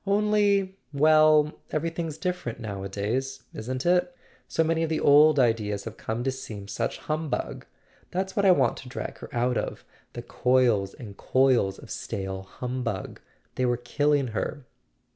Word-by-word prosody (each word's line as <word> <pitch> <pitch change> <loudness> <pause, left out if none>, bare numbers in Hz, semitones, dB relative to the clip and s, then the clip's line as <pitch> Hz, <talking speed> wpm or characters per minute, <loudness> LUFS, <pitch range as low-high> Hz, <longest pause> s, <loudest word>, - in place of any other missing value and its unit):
"Only— 200 -2 +2
well, 155 +1 +5 0.2
everything's 165 0 -3
different 180 -10 -3
nowadays, 110 +5 -3
isn't 130 +4 -4
it? 180 +7 +3 0.4
So 160 - +1
many 165 0 +1
of 165 - 0
the 160 - 0
old 150 +1 +6
ideas 110 -5 +1
have 115 -1 -7
come 115 +2 -3
to 135 - +1
seem 110 -6 -8
such 100 - -3
hum¬ 155 0 -2
bug. - - -4 0.4
That's 190 +1 -3
what 200 - +1
I 195 - +6
want 135 -9 +3
to 130 - -10
drag 130 - -6
her - - -9
out 125 -1 0
of—the 120 - -7
coils 120 -5 +2
and 105 -5 -10
coils 130 -7 +2
of - - -12
stale 95 -1 -4
humbug. 120 +1 -5 0.3
They 130 - 0
were 120 0 +1
killing 140 +2 +1
her." 125 +4 -4
130 Hz, 155 wpm, -26 LUFS, 115-155 Hz, 0.4 s, old